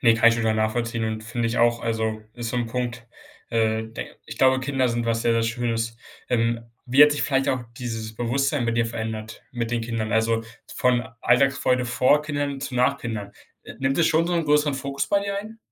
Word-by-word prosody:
Ne, 115 -2 +5
kann 115 0 +6
ich 115 - +3
schon 115 - -2
total 110 -1 +1
nachvollziehen 115 +1 -1
und 110 0 -3
finde 115 0 -2
ich 115 - -2
auch, 120 0 +3
also 110 -1 -1
ist 120 -1 -4
so 125 - -2
'n 120 -1 0
Punkt, 120 0 -4 0.4
äh, 110 -1 +1
den 110 +1 -7 0.2
ich 110 - -8
glaube, 130 0 +4
Kinder 130 -1 0
sind 115 0 -1
was 115 0 0
sehr, 115 - +3
sehr 115 0 +2
Schönes. 115 -1 -1 0.3
Ähm, 115 -1 +1 0.2
wie 130 +4 +6
hat 150 0 +7
sich 145 - -1
vielleicht 135 0 +1
auch 130 -2 0 0.2
dieses 110 -3 -5
Bewusstsein 135 +3 0
bei 115 - +1
dir 115 0 +1
verändert, 110 -1 -5
mit 115 -1 -3
den 120 -1 0
Kindern? 115 -1 -3
Also, 115 0 +2 0.3
von 125 -1 +2
Alltagsfreude 130 0 +3
vor 130 +5 +3
Kindern 145 -2 -3
zu 130 - -5
nach 125 +3 +2
Kindern. 105 -4 -5 0.3
Äh, - - -9
nimmt 135 +3 0
es 165 - +4
schon 165 +1 +3
so 175 - 0
'nen 170 - +1
größeren 150 -1 +3
Fokus 140 +1 -3
bei 200 0 +3
dir 200 0 -2
ein? 220 +2 -8
120 Hz, 220 wpm, -24 LUFS, 115-135 Hz, 0.4 s, hat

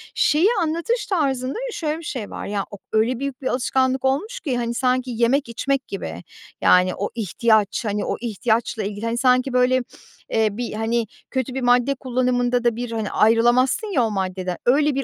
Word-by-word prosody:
şeyi 320 +7 +3
anlatış 335 +10 -1
tarzında 270 -8 0 0.2
şöyle 310 -1 -2
bir - - -11
şey 250 -8 -5
var. - - -6
Ya, 200 -1 -2
ok 205 - -10
öyle 230 +3 +1
büyük 275 0 -4
bir 260 - -2
alışkanlık 260 +1 +1
olmuş 405 - 0
ki, 265 - -2
hani, 235 -1 -2
sanki 255 0 0
yemek 240 +3 +1
içmek 270 +2 -1
gibi, 85 - -6 0.4
yani, 180 0 +5
o 200 - -3
ihtiyaç, 220 0 +1
hani, 210 0 -1
o - - -1
ihtiyaçla 225 0 -1
ilgili, 205 +2 -4
hani, 230 +1 -1
sanki, 255 +1 +3
böyle, 250 +1 +3 0.5
eee, 220 -1 +2
bir, 235 +3 -4
hani, 225 +1 -1 0.2
kötü 260 -1 -2
bir 265 - -3
madde 245 +2 +3
kullanımında 250 -1 0
da 240 -2 +2
bir, 240 0 -4
hani, 220 -3 -3
ayrılamazsın 240 - +3
ya 305 -12 +1
o 225 - 0
maddeden, 185 -2 -3
öyle 285 +3 +3
bir 275 - 0
245 Hz, 185 wpm, -22 LUFS, 225-265 Hz, 0.5 s, yani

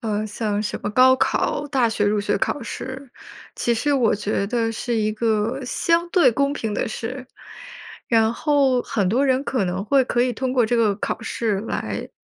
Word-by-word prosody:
呃， 215 -1 -2
像 210 -1 -2
什 210 - -3
么 205 - -2
高 255 +4 +5
考 290 +2 0
大 260 -4 +2
学 220 -2 -1
入 205 0 +1
学 205 - 0
考 290 - -2
试， 260 +2 -7 0.4
其 240 - 0
实 285 +5 +1
我 245 -5 +3
觉 205 -1 -2
得 230 0 0
是 235 +2 -3
一 215 -1 +1
个 225 +4 -1
相 335 +6 +1
对 355 -8 +5
公 280 +4 0
平 220 -7 -3
的 - - -1
事。 250 +4 -6 0.8
然 225 -1 +3
后 275 -3 +2
很 200 -4 -1
多 245 +8 +2
人 265 0 +2
可 255 -7 -1
能 185 +1 -2
会 270 +3 +3
可 245 - 0
以 250 0 +1
通 255 +2 -2
过 245 -3 +3
这 240 - +1
个 220 -3 +2
考 215 - -4
试 220 -3 -1
来， 225 - -4
235 Hz, 210 characters per minute, -22 LUFS, 215-260 Hz, 0.8 s, 高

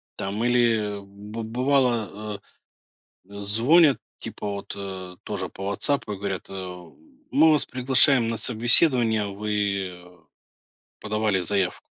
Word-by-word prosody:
Там, 100 +3 -3
или 115 -4 +2
б 100 +3 -9
бывало, 115 -4 0 0.9
э, - - -17
звонят 130 +9 +4 0.2
типа - - -7
вот, 100 -1 -5
э, 95 -2 -7
тоже - - -4
по 95 - -8
"Вотсапу" 105 +4 -1
и - - -4
говорят, 95 -1 -5
эм: 90 -2 -9 0.4
"Мы 160 0 +6
вас 150 - +2
приглашаем 130 -1 +3
на 115 - -2
собеседование, 115 -1 +3
вы 100 -4 -3 0.8
подавали 105 -2 0
заявку". 95 0 -1
105 Hz, 115 wpm, -24 LUFS, 100-120 Hz, 0.9 s, Мы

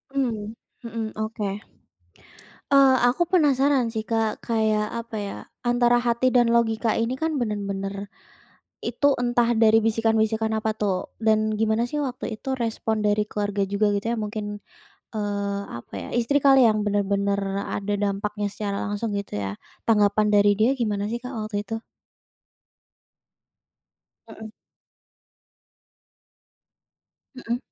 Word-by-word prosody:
Mmm, 225 -5 -2 0.3
mhm, 230 0 -4 0.2
oke, 215 0 -3 1.3
eee, 270 -1 +6
aku 255 +8 0
penasaran 280 -7 +3
sih, 220 -1 -3
Kak, 225 -1 0
kayak 215 -2 +1
apa 230 -1 -8
ya 200 -1 -4 0.2
antara 240 0 +3
hati 240 +1 +1
dan 240 -2 +4
logika 225 -1 +2
ini 235 +3 -1
kan 320 -1 -1
bener-bener, 200 -4 -3 0.8
itu 285 -1 +2
entah 240 -1 +2
dari 220 0 +5
bisikan-bisikan 220 0 +1
apa 220 0 -1
tuh 195 -4 -2
dan 215 0 +2
gimana 220 +2 +1
sih 295 +2 -2
waktu 255 -3 -4
itu 265 +4 -4
respon 225 -1 -1
dari 210 0 +3
keluarga 205 -1 -1
juga 200 +2 +1
gitu 200 +2 -2
ya - - -1
mungkin, 210 -1 -4 0.5
eee, 200 -2 -2 0.2
apa 120 - -14
ya - - -7
istri 245 +5 +2
kali 270 -2 +6
yang 215 -2 +4
bener-bener 200 0 +1 0.4
ada 205 +1 -2
dampaknya 205 +1 -1
secara 200 0 -4
langsung 205 +2 -2
gitu 200 - -7
ya? 100 -1 -2 0.3
Tanggapan 210 -1 +3
dari 205 0 +5
dia 220 +5 +3
gimana 210 -2 -1
sih, 235 - -2
Kak, 250 +2 -8
waktu 215 -1 -6
itu? 225 - -3 2.5
Mhm. 220 -1 -10 2.8
Mhm. 240 -2 -3
220 Hz, 130 wpm, -24 LUFS, 205-240 Hz, 2.8 s, eee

